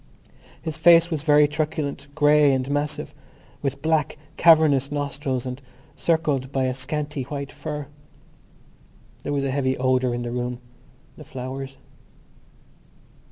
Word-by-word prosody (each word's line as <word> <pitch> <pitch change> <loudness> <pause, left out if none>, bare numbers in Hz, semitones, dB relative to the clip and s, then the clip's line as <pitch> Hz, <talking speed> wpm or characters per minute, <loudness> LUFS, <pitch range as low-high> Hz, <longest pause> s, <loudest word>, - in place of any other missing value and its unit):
His 160 -2 -5
face 170 0 +6
was 155 -3 -1
very 150 -1 +5
truculent, 150 -2 -3
grey 150 -1 +5
and 130 -1 -1
massive, 145 +1 -2 0.5
with 140 0 -3
black 160 -2 +1 0.2
cavernous 155 -5 +5
nostrils 140 -3 -2
and 125 +2 -5 0.3
circled 150 -6 0
by 135 -2 0
a 130 0 0
scanty 145 +2 -4
white 140 +1 -5
fur. 150 0 -5 1.4
There - - -4
was 140 -1 0
a 135 - -1
heavy 130 -1 0
odour 130 -1 +1
in 120 - -3
the 120 - -4
room—the 125 0 -8
flowers. 135 +1 -7
140 Hz, 125 wpm, -24 LUFS, 130-150 Hz, 1.4 s, face